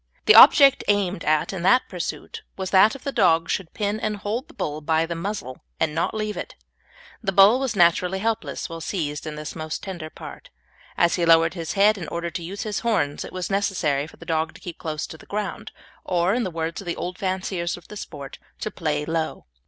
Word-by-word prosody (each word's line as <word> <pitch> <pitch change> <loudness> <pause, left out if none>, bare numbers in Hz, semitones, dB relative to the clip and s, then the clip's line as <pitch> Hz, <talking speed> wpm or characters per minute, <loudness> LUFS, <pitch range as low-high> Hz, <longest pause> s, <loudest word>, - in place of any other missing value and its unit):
The 435 - +7
object 275 -2 +8
aimed 200 -4 +1
at 155 +4 +1
in 190 - -4
that 250 +8 +4
pursuit 180 -3 -6 0.2
was 190 -1 -4
that 200 +3 +6
the 280 - -2
dog 165 -8 +3
should 180 -4 -3
pin 210 0 -1
and 215 -1 -2
hold 210 +5 -3
the - - -18
bull 150 +1 -3
by 160 +1 +1
the 170 - -4
muzzle, 170 -7 -5 0.2
and 160 -2 +1
not 165 +7 -1
leave 215 -1 -2
it. - - -6 0.7
The 205 -4 -1
bull 200 +6 +6
was 265 -5 -2
naturally 180 +1 +3
helpless 225 +2 -2
when 165 -1 -7
seized 155 -4 -3
in 150 -1 -6
his 150 0 -6
most 155 -1 -5
tender 175 -5 -6
part. - - -11 0.5
As 170 +1 +3
he 175 - 0
lowered 165 0 +5
his 165 -3 -4
head 205 +1 +4
in 170 - -6
order 170 +1 -4
to 170 - -5
use 195 +4 -5
his 215 -2 -2
horns 145 -12 0
it - - -9
was 185 +1 -4
necessary 170 -8 0
for - - -16
the - - -12
dog 160 0 -1
to - - -12
keep 175 -2 -8
close 155 -2 -3
to 160 - -11
the - - -16
ground, 210 +1 -4 0.3
or, 180 +2 +1
in 245 +1 0
the 190 - -2
words 165 0 -4
of 195 - -12
the 170 - -2
old 180 0 -5
fanciers 185 -3 -2
of 175 - -16
the 210 - -10
sport, 145 -8 -8 0.2
to 215 - -3
"play 150 -3 -2
low." 165 0 -3
175 Hz, 225 wpm, -24 LUFS, 160-205 Hz, 0.7 s, object